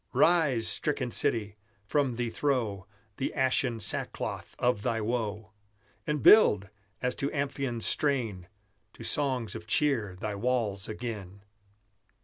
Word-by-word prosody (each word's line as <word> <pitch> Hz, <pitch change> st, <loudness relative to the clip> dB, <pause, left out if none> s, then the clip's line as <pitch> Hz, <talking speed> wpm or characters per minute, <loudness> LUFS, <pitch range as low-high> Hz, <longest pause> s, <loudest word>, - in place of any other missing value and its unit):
Rise, 150 Hz, -10 st, +3 dB
stricken 130 Hz, -5 st, -1 dB
city! 105 Hz, -2 st, +2 dB, 0.3 s
from 135 Hz, +2 st, +1 dB
thee 120 Hz, -1 st, -2 dB
throw 115 Hz, -10 st, -1 dB, 0.3 s
The 135 Hz, -, -2 dB
ashen 130 Hz, -3 st, +1 dB
sackcloth 105 Hz, -, -3 dB
of 120 Hz, -4 st, +1 dB
thy 115 Hz, +2 st, -1 dB
woe; 110 Hz, -2 st, -3 dB, 0.6 s
And 150 Hz, -2 st, -1 dB
build, 105 Hz, -, +6 dB, 0.3 s
as 125 Hz, 0 st, +1 dB
to 140 Hz, -, -1 dB
Amphion's 135 Hz, -4 st, -2 dB
strain, 115 Hz, -11 st, 0 dB, 0.5 s
To -, -, -11 dB
songs 130 Hz, -7 st, 0 dB
of 110 Hz, -1 st, -8 dB
cheer 115 Hz, -7 st, +1 dB
thy 105 Hz, 0 st, -3 dB
walls 105 Hz, -3 st, -1 dB
again! 105 Hz, -4 st, -6 dB
120 Hz, 125 wpm, -29 LUFS, 105-135 Hz, 0.6 s, build